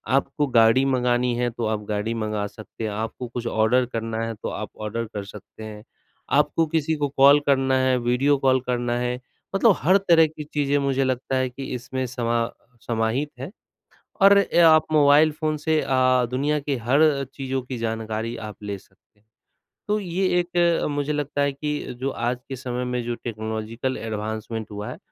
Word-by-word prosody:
आपको 140 +2 0
गाड़ी 115 +1 +5
मँगानी 125 -2 +1
है, 120 0 0
तो 115 0 -4
आप 110 -1 -1
गाड़ी 105 +2 -1
मँगा 110 -2 -2
सकते 110 +2 -10
हैं, 110 - -2
आपको 110 +4 -4
कुछ 120 0 -5
ऑर्डर 115 +3 +2
करना 115 0 -3
है 115 - -4
तो - - -5
आप - - -5
ऑर्डर 110 +2 -3
कर 105 - -4
सकते 105 +2 -12
हैं। 105 -1 -9 0.6
आपको 165 - +2
किसी 160 0 0
को 145 -1 -1
कॉल 140 +2 +7
करना 135 -1 +3
है, 130 -1 +2
वीडियो 125 +4 +2
कॉल 130 -1 +3
करना 120 -1 0
है 125 0 -2 0.4
मतलब 200 0 +5
हर 185 +5 +4
तरह 170 -5 +4
की 155 0 -8
चीज़ें 145 -1 0
मुझे 135 -1 +1
लगता 130 0 -1
है 130 -1 +1
कि 135 +2 -8
इसमें 130 +1 -4
समा 120 -1 -1 0.4
समाहित 115 +5 0
हैं 135 +7 -6 0.7
और 200 +1 +8 0.3
आप 155 -1 +6
मोबाइल 150 +1 +5
फ़ोन 155 0 -2
से 155 +1 +1
अ, 130 -1 +2
दुनिया 145 +4 0
के 140 -1 -2
हर 140 +4 +2
चीज़ों 135 -1 -3
की 130 0 -6
जानकारी 110 0 -3
आप 110 -2 -7
ले 100 -1 -4
सकते 105 - -27
हैं। 105 - -38 0.6
तो 210 +1 +2
ये 190 0 -1
एक 175 -1 +1
मुझे 145 +1 -1
लगता 145 -1 -2
है 140 0 +1
कि 150 -1 -4
जो 135 +1 -1
आज 120 0 -2
के 135 - -5
समय 125 0 -4
में 125 0 -2
जो 120 0 -2
टेक्नोलॉजिकल 110 +2 -4
एडवांसमेंट 110 0 -5
हुआ 105 0 -6
है, - - -8
125 Hz, 185 wpm, -23 LUFS, 115-145 Hz, 0.7 s, और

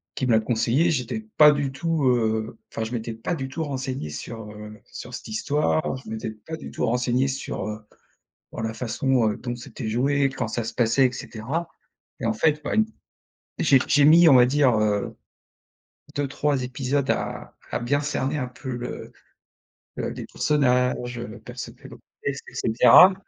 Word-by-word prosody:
qui 130 - -1
me 125 - +1
l'a 110 - +5
conseillé. 120 +8 +2
J'étais 130 - -1 0.2
pas 150 -1 +9
du 145 -2 -1
tout, 160 +1 -1
heu, 110 -2 +1
enfin, 110 - -3
je 110 - -5
m'étais 115 -1 -3
pas 115 +10 -3
du 135 -4 -5
tout 160 +5 -3
renseigné 130 - -4
sur, 110 +7 -7
heu, 105 0 -10
sur - - -9
cette - - -7
histoire. 145 +7 0
Je 130 - -11
m'étais 110 0 -4
pas 110 +9 -8
du - - -9
tout - - -1
renseigné 125 +2 +1
sur, 130 -6 -4
heu, 105 0 -5 0.7
sur - - -5
la 110 0 -2
façon, 120 +1 +1
heu, 105 - -3
dont 120 -1 -4
c'était 120 -1 -7
joué, 135 +5 +2
quand 135 -3 -3
ça 120 +1 -2
se 115 - -4
passait 120 +3 +4
et 125 - -3
cetera. 130 +8 -4 0.5
Et - - -2
en 115 - +2
fait, 150 +6 +1
bah, - - -2
une 220 -1 +3 0.7
j'ai 140 -4 +5
j'ai 145 0 +5
mis 165 +2 +8
on 135 - +7
va 125 - +8
dire, 135 -1 +3
heu, 105 -1 0 1.0
2-3 140 -1 0
épisodes 130 +2 -1
à - - -3 0.2
à - - -1
bien 140 +4 +1
cerner 145 0 -1
un 125 - -2
peu 130 +1 -8
le 120 0 -6 0.8
le - - -2
les - - -6
personnages, 125 -4 +1
heu, 120 -1 -7
percevoir 125 +1 -9
le - - -10 0.3
contexte - - -3
et - - -19
cetera. 150 - +7
125 Hz, 185 wpm, -24 LUFS, 115-145 Hz, 1.0 s, pas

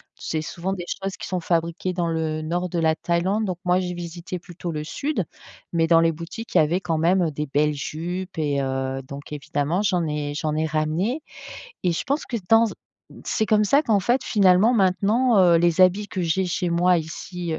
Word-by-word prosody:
C'est 155 - -3
souvent 175 +4 -4
des 180 - -5 0.2
choses 195 0 -3
qui - - -7
sont 185 -1 -2
fabriquées 170 +2 -1
dans 175 -1 -1
le 160 -1 -1
nord 175 +3 -2
de 175 - -3
la 160 -1 +2
Thaïlande, 185 +7 0
donc 185 -3 -3
moi 180 +1 +3
j'ai 180 -1 -3
visité 175 +1 -6
plutôt 175 -1 -7
le 150 -1 -4
sud, 215 - -2 0.5
mais 165 -1 +2
dans 165 -1 +6
les 165 - +3
boutiques 170 +9 -8
il - - +7
y - - +7
avait 170 +5 +1
quand 165 -3 -1
même, 175 +4 +3
heu, 160 - 0
des 150 +1 -4
belles 150 +2 +1
jupes 175 +6 -5
et 145 -3 0
heu, 135 0 -2
donc 140 +1 -9
évidemment 150 +4 -1
j'en 180 -4 +1
ai 150 -1 -3
j'en 155 -1 -1
ai 155 +1 0
ramenées 160 - -1 0.6
et 175 - +3
je - - -2
pense 280 +4 -1
que 240 - -4
dans 225 0 +6
z 215 - -5 0.5
c'est 220 - 0
comme 215 0 +3
ça 280 +9 +4
qu'en 215 -7 +2
fait 240 +7 +1
finalement 200 +2 +4
maintenant, 210 +3 +3
heu, 175 -2 +6
les 170 +2 +4
habits 200 +3 +3
que 185 - -3
j'ai 180 +3 +1
chez 175 0 -1
moi 175 +1 +3
ici, 170 +2 -5
heu, 160 - -2
175 Hz, 220 wpm, -23 LUFS, 160-190 Hz, 0.6 s, il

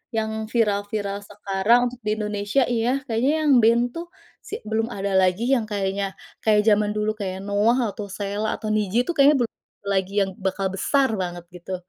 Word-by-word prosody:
yang 220 0 -2
viral-viral 205 -2 -1
sekarang 205 +4 +1
untuk 245 - -12
di 215 - +2
Indonesia 210 +3 0
iya 245 +3 0
kayaknya 245 +3 +1
yang 295 - +3
band 230 +1 +4
tuh 335 +5 -7 0.3
si - - -13
belum 220 +1 -1
ada 200 -4 -3
lagi 185 +4 +2
yang 235 -5 +2
kayaknya 195 -1 -2 0.3
kayak 210 -1 +4
zaman 210 -1 +2
dulu 210 0 0
kayak 190 -1 -4
NOAH 215 +3 +2
atau 205 0 -7
Sheila 205 +2 -3
atau 215 -1 -4
Nidji 215 +3 +1
tuh 345 - -2
kayaknya 285 +2 +7
belum 225 - -4 0.3
lagi 195 -1 -1
yang 190 - -3
bakal 190 0 -1
besar 265 +7 +1
banget 175 -2 -4
gitu. 180 +1 -6
210 Hz, 175 wpm, -23 LUFS, 200-230 Hz, 0.3 s, kayaknya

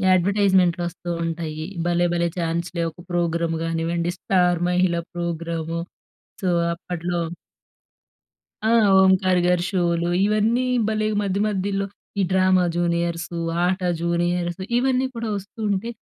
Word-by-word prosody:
అడ్వర్టైజ్మెంట్‌లు 185 -2 +3
వస్తూ 175 0 -8 0.2
ఉంటాయి. 160 -2 -4 0.2
'భలే 175 0 +2
భలే 170 0 +1
ఛాన్స్ 170 +1 -1
లే!' 170 - +1
ఒక 160 - -23
ప్రోగ్రామ్ 170 -1 0
కానివ్వండి, 165 +1 -1
'స్టార్ 180 -2 +2
మహిళా' 180 -1 +1
ప్రోగ్రాము. 170 -1 -3 0.6
సో, 185 - +1 0.2
అప్పట్లో 175 0 -4 1.5
ఆ! - - +3 0.3
ఓంకార్ 190 -1 +4
గారి 180 -1 +2
షోలు. 170 -3 0 0.2
ఇవన్నీ 215 +4 +2 0.2
భలే 215 -1 0
మధ్య 200 -1 -1
మధ్యలో 200 -1 -1 0.3
ఈ - - +3
'డ్రామ 185 0 +4 0.2
జూనియర్స్', 170 0 0 0.4
'ఆట 185 +2 +1 0.2
జూనియర్స్' 175 +1 0 0.2
ఇవన్నీ 260 +1 +2
కూడా 230 -1 -3
వస్తూ 200 +3 -11
ఉంటే 200 +4 -1
175 Hz, 120 wpm, -23 LUFS, 170-190 Hz, 1.5 s, ఓంకార్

